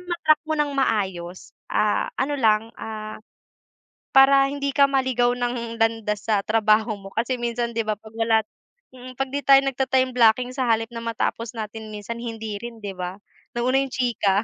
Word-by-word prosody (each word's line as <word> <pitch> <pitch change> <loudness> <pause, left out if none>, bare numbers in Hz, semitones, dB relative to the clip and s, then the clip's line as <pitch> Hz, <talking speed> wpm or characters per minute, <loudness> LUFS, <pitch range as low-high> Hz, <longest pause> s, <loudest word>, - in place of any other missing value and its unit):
ma-track 310 -3 +2
mo 315 - +1
nang 295 -1 0
maayos, 190 -9 -2 0.2
ah, 210 -1 +1
ano, 285 0 -1
lang, 220 0 +2
ah, 215 -1 -6 1.0
para 275 0 +7
hindi 280 -1 -3
ka 280 -1 +5
maligaw 260 -3 +2
ng 240 -1 -3
landas 225 -2 0
sa 210 -3 +2
trabaho 215 0 +2
mo 195 0 -12
kasi 245 +3 -1
minsan, 235 0 -2
'di 230 -1 -2
ba, 215 - 0
'pag 215 +1 -13
wala 225 -1 +3 0.5
mm, 255 0 -11
'pag 270 +1 -3
'di 280 -1 -4
tayo 275 0 +7
nagta-time 265 -1 +1
blocking 245 0 +3
sa 255 0 -2
halip 225 -1 +1
na 230 -1 -7
matapos 230 0 -2
natin 220 -1 -7
minsan 210 +3 -6
hindi 225 -3 -5
rin, 230 0 -9
'di 195 -2 -6
ba, 180 +2 -5 0.3
nauna 250 +2 +1
yung 270 -1 -1
chika, 220 -6 +1
230 Hz, 175 wpm, -23 LUFS, 215-260 Hz, 1.0 s, para